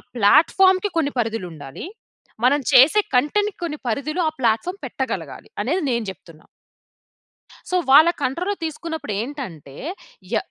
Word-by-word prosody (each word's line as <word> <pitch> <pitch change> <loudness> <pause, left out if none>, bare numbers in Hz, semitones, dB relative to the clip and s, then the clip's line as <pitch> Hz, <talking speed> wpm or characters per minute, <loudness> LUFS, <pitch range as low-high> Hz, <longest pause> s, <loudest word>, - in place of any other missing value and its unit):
ప్లాట్‌ఫార్మ్‌కి 370 - +4
కొన్ని 290 -3 0
పరిధులుండాలి. 180 - -5 0.6
మనం 275 +4 +4
చేసే 275 +10 +7 0.2
కంటెంట్‌కి 410 +11 +1
కొన్ని 310 -3 -3
పరిధులు, 285 +8 -2
ఆ - - -10
ప్లాట్‌ఫార్మ్ 240 - 0
పెట్టగలగాలి, - - -5
అనేది 310 - 0
నేను 235 -2 -1
చెప్తున్నా. 165 -4 -17 1.2
సో, 365 - -1 0.2
వాళ్ళ 310 +5 +8
కంట్రోల్‌లో 355 +11 -1
తీసుకున్నప్పుడేంటంటే, 275 - -5 0.6
య - - +3
280 Hz, 110 wpm, -22 LUFS, 220-335 Hz, 1.2 s, వాళ్ళ